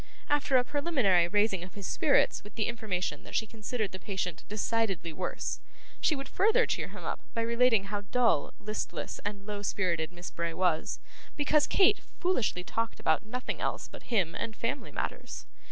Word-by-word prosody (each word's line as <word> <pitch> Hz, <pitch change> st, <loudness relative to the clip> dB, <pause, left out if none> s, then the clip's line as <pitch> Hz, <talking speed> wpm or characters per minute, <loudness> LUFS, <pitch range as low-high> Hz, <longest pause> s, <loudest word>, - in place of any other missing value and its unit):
After 290 Hz, -2 st, +4 dB
a 250 Hz, -, +4 dB
preliminary 250 Hz, -, +3 dB
raising 205 Hz, -1 st, +2 dB
of 180 Hz, -, -10 dB
his 200 Hz, -2 st, -6 dB
spirits 280 Hz, +7 st, +3 dB
with 205 Hz, +1 st, -13 dB
the 220 Hz, -, +1 dB
information 215 Hz, -6 st, -2 dB
that -, -, -8 dB
she 220 Hz, -, +2 dB
considered 215 Hz, -1 st, -3 dB
the 190 Hz, -, -7 dB
patient 180 Hz, -5 st, -3 dB
decidedly 210 Hz, -5 st, 0 dB
worse, 180 Hz, +2 st, -3 dB, 0.4 s
she 310 Hz, -, +3 dB
would 275 Hz, -1 st, -5 dB
further 445 Hz, -, +4 dB
cheer -, -, -1 dB
him -, -, -10 dB
up -, -, -2 dB, 0.2 s
by 230 Hz, -, +1 dB
relating 235 Hz, -2 st, +4 dB
how 205 Hz, +1 st, -3 dB
dull, 225 Hz, -, +2 dB
listless, 215 Hz, +1 st, -4 dB
and 205 Hz, -1 st, -4 dB
low 205 Hz, -1 st, -4 dB
spirited 175 Hz, -5 st, 0 dB
Miss 175 Hz, 0 st, -8 dB
Bray 170 Hz, -1 st, -2 dB
was, 180 Hz, -4 st, +1 dB, 0.4 s
because 295 Hz, 0 st, +3 dB
Kate 395 Hz, +1 st, +5 dB, 0.2 s
foolishly 250 Hz, -, +1 dB
talked 230 Hz, +4 st, -2 dB
about 160 Hz, +7 st, +2 dB
nothing 250 Hz, +3 st, -3 dB
else -, -, -1 dB
but -, -, -12 dB
him 190 Hz, -9 st, +2 dB
and 225 Hz, -, -4 dB
family 270 Hz, +5 st, -2 dB
matters. -, -, -4 dB
210 Hz, 175 wpm, -30 LUFS, 185-250 Hz, 0.4 s, Kate